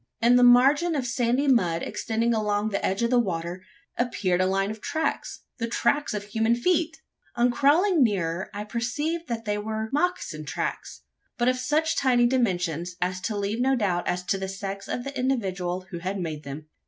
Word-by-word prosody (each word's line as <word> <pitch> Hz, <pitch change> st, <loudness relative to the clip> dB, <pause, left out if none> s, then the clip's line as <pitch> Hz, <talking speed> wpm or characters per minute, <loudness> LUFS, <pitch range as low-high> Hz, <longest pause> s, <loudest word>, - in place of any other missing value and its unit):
In 240 Hz, +2 st, +5 dB
the 250 Hz, -, +5 dB
margin 275 Hz, +7 st, +5 dB
of 270 Hz, -4 st, -1 dB
sandy 245 Hz, +3 st, +1 dB
mud 175 Hz, -11 st, +2 dB
extending 230 Hz, +1 st, -1 dB
along 210 Hz, -1 st, 0 dB
the 200 Hz, -, -2 dB
edge 195 Hz, +4 st, 0 dB
of 235 Hz, -, +1 dB
the 250 Hz, -, +5 dB
water, 175 Hz, -3 st, -3 dB, 0.4 s
appeared 195 Hz, -7 st, +1 dB
a 185 Hz, -, +2 dB
line 195 Hz, +2 st, 0 dB
of 220 Hz, 0 st, -9 dB
tracks 315 Hz, 0 st, -3 dB, 0.2 s
the 230 Hz, -, -1 dB
tracks 240 Hz, +2 st, 0 dB
of 205 Hz, -, -3 dB
human 225 Hz, +3 st, +1 dB
feet! 325 Hz, +5 st, 0 dB, 0.4 s
On 240 Hz, +1 st, +3 dB
crawling 310 Hz, +7 st, +3 dB
nearer, 185 Hz, -5 st, -1 dB
I 205 Hz, 0 st, -5 dB
perceived 290 Hz, +10 st, -2 dB
that 230 Hz, -1 st, -4 dB
they 210 Hz, 0 st, -1 dB
were 220 Hz, +1 st, -4 dB
mocassin 280 Hz, -, -1 dB
tracks, -, -, -4 dB, 0.3 s
but 240 Hz, 0 st, +1 dB
of 255 Hz, 0 st, +3 dB
such 305 Hz, +5 st, +1 dB
tiny 245 Hz, -2 st, +3 dB
dimensions, 180 Hz, -, 0 dB
as 185 Hz, +1 st, -2 dB
to 215 Hz, 0 st, -2 dB
leave 205 Hz, +4 st, -1 dB
no 265 Hz, +1 st, +3 dB
doubt 190 Hz, -7 st, 0 dB
as 180 Hz, 0 st, -1 dB
to 190 Hz, +2 st, -1 dB
the 190 Hz, 0 st, -4 dB
sex 195 Hz, 0 st, -6 dB
of 245 Hz, -, -3 dB
the 275 Hz, +1 st, -6 dB
individual 190 Hz, -9 st, -1 dB
who 175 Hz, -, -5 dB
had 190 Hz, +3 st, -3 dB
made 160 Hz, -4 st, -4 dB
them. 145 Hz, +1 st, -8 dB
225 Hz, 190 wpm, -26 LUFS, 185-255 Hz, 0.4 s, In